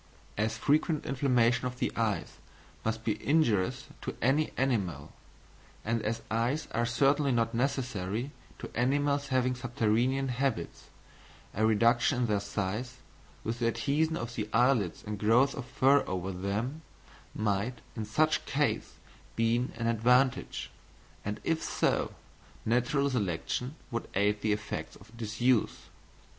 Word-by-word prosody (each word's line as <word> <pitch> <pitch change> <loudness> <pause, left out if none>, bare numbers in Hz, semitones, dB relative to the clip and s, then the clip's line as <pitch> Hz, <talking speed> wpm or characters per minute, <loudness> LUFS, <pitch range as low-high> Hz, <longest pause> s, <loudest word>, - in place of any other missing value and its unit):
As 110 +2 0
frequent 155 +1 +1
inflammation 125 -2 +2
of 125 0 -6
the - - 0
eyes 110 -3 -1 0.5
must 110 0 -2
be 110 -2 -2
injurious 120 - +2 0.2
to - - -4
any 140 +6 +2
animal, 95 - -1 0.7
and 115 +1 0
as 110 +2 -2
eyes 120 +7 0
are 120 0 0
certainly 140 +4 +3
not 115 -1 +1
necessary 120 -2 -1 0.3
to - - -9
animals 140 +3 +1
having 130 -1 +2
subterranean 120 +2 0
habits, 125 -8 -2 0.7
a 110 +2 +2
reduction 115 +4 +3
in - - +3
their 105 -3 +1
size, 105 +5 -3 0.5
with 115 +1 -3
the 115 - +2
adhesion 145 +8 +1
of 120 -4 -5
the 105 -2 -3
eyelids 115 -7 +2
and 105 -1 -4
growth 120 +6 +4
of 135 - -6
fur 135 +2 +4
over 95 +1 -2
them, 105 - -3 0.5
might 110 +3 -1 0.2
in 110 - -3
such 155 +9 +2
case - - 0 0.4
be 115 0 +2 0.2
an 115 0 -3
advantage; 125 +3 +2 0.5
and 105 +1 -3
if 165 -1 0
so, - - 0 0.5
natural 125 +5 +2
selection 125 - -2 0.2
would 115 - -3
aid 105 +1 +2
the 110 - +1
effects 105 0 -3
of 110 +1 -16
disuse. 115 +2 0
120 Hz, 135 wpm, -30 LUFS, 110-135 Hz, 0.7 s, growth